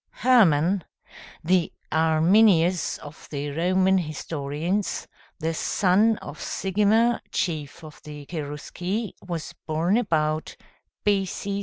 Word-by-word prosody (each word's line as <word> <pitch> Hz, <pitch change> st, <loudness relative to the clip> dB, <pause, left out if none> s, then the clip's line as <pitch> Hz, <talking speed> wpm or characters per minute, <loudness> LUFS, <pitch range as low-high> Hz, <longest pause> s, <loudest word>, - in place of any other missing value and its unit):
] -, -, -51 dB
Hermann, 190 Hz, -, +4 dB, 0.6 s
the 180 Hz, +1 st, +2 dB, 0.2 s
Arminius 165 Hz, +2 st, +3 dB
of 145 Hz, +1 st, -12 dB
the 145 Hz, 0 st, -4 dB
Roman 185 Hz, +4 st, +2 dB
historians, 160 Hz, +3 st, -3 dB, 0.3 s
the 165 Hz, 0 st, -2 dB
son 205 Hz, +6 st, +2 dB
of 145 Hz, +1 st, -9 dB
Sigimer, 210 Hz, +5 st, +1 dB
chief 155 Hz, -2 st, -3 dB
of 155 Hz, -1 st, -12 dB
the 150 Hz, -1 st, -10 dB
Cherusci, 175 Hz, +7 st, -4 dB
was 170 Hz, -3 st, -5 dB
born 165 Hz, +6 st, +1 dB
about 155 Hz, -8 st, 0 dB, 0.5 s
B.C. 200 Hz, 0 st, 0 dB
170 Hz, 105 wpm, -25 LUFS, 155-195 Hz, 0.6 s, Hermann